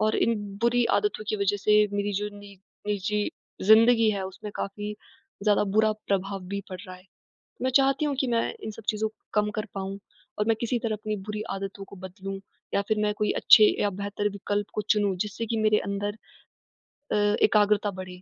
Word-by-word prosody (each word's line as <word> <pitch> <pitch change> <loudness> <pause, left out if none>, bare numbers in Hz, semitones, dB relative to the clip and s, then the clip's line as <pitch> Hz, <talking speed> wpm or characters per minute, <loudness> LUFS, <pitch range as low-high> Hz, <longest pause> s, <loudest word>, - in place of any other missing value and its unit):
और 215 0 +2
इन 230 - +2 0.3
बुरी 240 0 +3
आदतों 415 - -2
की 215 - 0
वजह 200 0 +1
से 210 +1 +4
मेरी 205 0 -1
जो 205 +1 -1
नि 205 -1 -12 0.3
निजी 210 +1 0 0.4
ज़िंदगी 225 0 +6
है, 200 -2 -2
उसमें 200 +3 -8
काफ़ी 205 +1 -4 0.5
ज़्यादा 210 -1 +4
बुरा 220 0 +5 0.2
प्रभाव 195 0 -1
भी 200 0 -3
पड़ 185 -1 -6
रहा 185 0 -9
है। 185 - -19 0.6
मैं 260 - +1
चाहती 275 +2 +4
हूँ 285 -2 0
कि 265 - +1
मैं 230 -1 +2 0.2
इन 220 - -4
सब 220 +1 -12
चीज़ों 215 0 0
को 220 - -30 0.2
कम 210 0 +2
कर 215 +1 -2
पाऊँ 195 0 -4 0.4
और 210 - +2
मैं 225 - +4
किसी 235 +1 0
तरह 220 -2 -1
अपनी 215 0 -3
बुरी 210 +2 -5
आदतों 195 0 -5
को 200 - -13
बदलूँ। 195 +1 -7 0.3
या 200 - +3
फिर 215 -1 +1
मैं 210 0 +1
कोई 210 - +1
अच्छे 215 -1 +7 0.2
अ, - - +2
बेहतर 205 +1 -2
विकल्प 205 +1 -2
को 210 - -1
चुनूँ, 205 -2 +1
जिससे 210 +4 -3
कि 225 +1 -2
मेरे 215 -1 +3
अंदर 205 +2 -2 0.9
अ, - - +2
एकाग्रता 210 0 +3
बढ़े। 185 -1 -8
210 Hz, 200 wpm, -27 LUFS, 200-215 Hz, 0.9 s, अच्छे